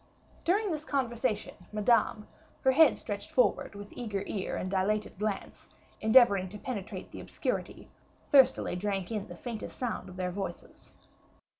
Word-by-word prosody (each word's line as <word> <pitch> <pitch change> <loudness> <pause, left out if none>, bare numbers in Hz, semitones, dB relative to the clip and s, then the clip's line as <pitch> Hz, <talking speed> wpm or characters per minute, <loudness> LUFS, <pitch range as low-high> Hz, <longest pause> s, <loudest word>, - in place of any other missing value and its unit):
During 405 +3 +2
this 305 -1 -3
conversation, 250 -5 -1 0.2
Madame, 215 0 +2 0.3
her 265 - +4
head 315 +4 +6
stretched - - -6
forward - - +2
with 205 0 -9
eager 210 -5 -3
ear 195 -2 -3
and 185 - -3
dilated 200 +1 0
glance, 210 -1 -4 0.3
endeavoring 220 -5 +6
to 210 - -8
penetrate 210 -4 -6
the - - -8
obscurity, - - -3 0.4
thirstily 270 - +5
drank 195 0 -2
in 210 -3 -3
the 175 - -9
faintest 230 +3 -6
sound 245 -3 -3
of 180 - -11
their 180 -1 -2
voices. 190 -2 -7
215 Hz, 145 wpm, -30 LUFS, 195-250 Hz, 0.4 s, head